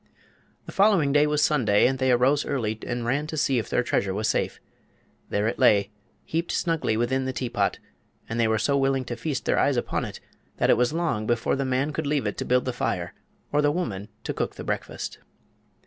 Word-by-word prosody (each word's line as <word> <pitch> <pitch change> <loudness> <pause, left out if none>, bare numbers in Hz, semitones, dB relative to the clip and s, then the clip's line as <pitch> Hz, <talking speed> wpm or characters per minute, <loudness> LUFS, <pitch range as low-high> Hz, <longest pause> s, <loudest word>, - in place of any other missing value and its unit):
The - - -8
following 195 -9 +3
day 145 +1 +5
was 150 0 +1
Sunday, 115 -9 +3
and 130 +1 +1
they 130 -1 +2
arose 130 +4 +3
early 110 -6 -2
and 120 -1 -2
ran 140 +5 0
to 155 - -5
see 135 -4 +2
if 110 - -5
their 125 - +1
treasure 100 -5 0
was 110 +2 -1
safe. - - -1 0.7
There 105 +1 0
it 115 - -2
lay, 100 -1 +4 0.3
heaped 165 +2 -2
snugly 165 -10 0
within 130 +3 0
the 130 - -1
teapot, 125 -2 -1 0.5
and 115 +1 -3
they 115 - +3
were 110 0 +2
so 140 +6 +1
willing 135 -1 +1
to 120 - -4
feast 145 0 -3
their - - +2
eyes - - +2
upon - - -1
it - - -8 0.4
that - - +3
it - - +6
was 125 +1 +2
long 155 -10 -1
before 120 -1 +1
the 135 0 -1
man 130 +3 0
could 155 0 -2
leave 145 -1 0
it - - -2
to - - -2
build 125 0 +2
the 125 - -2
fire 90 -7 -2 0.4
or 150 - +3
the 145 - +3
woman 105 - -3 0.2
to - - -3
cook - - -3
the - - -7
breakfast. - - -4
130 Hz, 220 wpm, -25 LUFS, 115-145 Hz, 0.7 s, it